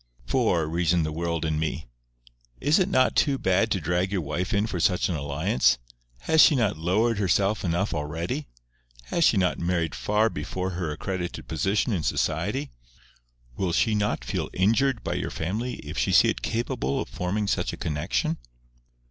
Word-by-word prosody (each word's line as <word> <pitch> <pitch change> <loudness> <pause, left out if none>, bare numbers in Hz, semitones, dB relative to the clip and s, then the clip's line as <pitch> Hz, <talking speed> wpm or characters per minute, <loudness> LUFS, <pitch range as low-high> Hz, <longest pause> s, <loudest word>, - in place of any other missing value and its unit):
"For," 90 - +1
reasoned 85 +1 +1
the 80 - -3
world 85 0 -2
in 80 -1 0
me, 80 -1 -2 0.7
"is 150 +7 +3
it 190 +1 +2
not 130 -8 +3
too 140 -3 +3
bad 95 +1 +2
to 100 - 0
drag 90 +4 0
your 95 -3 0
wife 90 +6 -3
in 100 -1 +2
for 95 -5 -3
such 90 +2 +2
an 90 - -1
alliance? 70 -4 +1 0.4
Has 160 - +4
she 155 - +7
not 110 -9 +1
lowered 100 +8 +1
herself 100 +2 +1
enough 90 +3 0
already? 75 0 -3 0.6
Has 170 - +2
she 115 - +4
not 90 -2 +1
married 85 -2 0
far 105 +2 +1
below 90 +5 -3
her 90 -3 -3
accredited 90 +3 -4
position 100 +8 0
in 90 - 0
society? 70 -2 -1 0.8
Will 90 +1 -1
she 110 - +2
not 105 0 -1
feel - - -2
injured 115 +6 +2
by - - -2
your - - -2
family 110 +10 -3
if - - -5
she - - +1
see - - +6
it - - -2
capable 90 - -1
of - - -3
forming 100 +4 -2
such 100 - 0
a - - -7
connexion?" 75 -1 -1
90 Hz, 175 wpm, -26 LUFS, 80-105 Hz, 0.8 s, she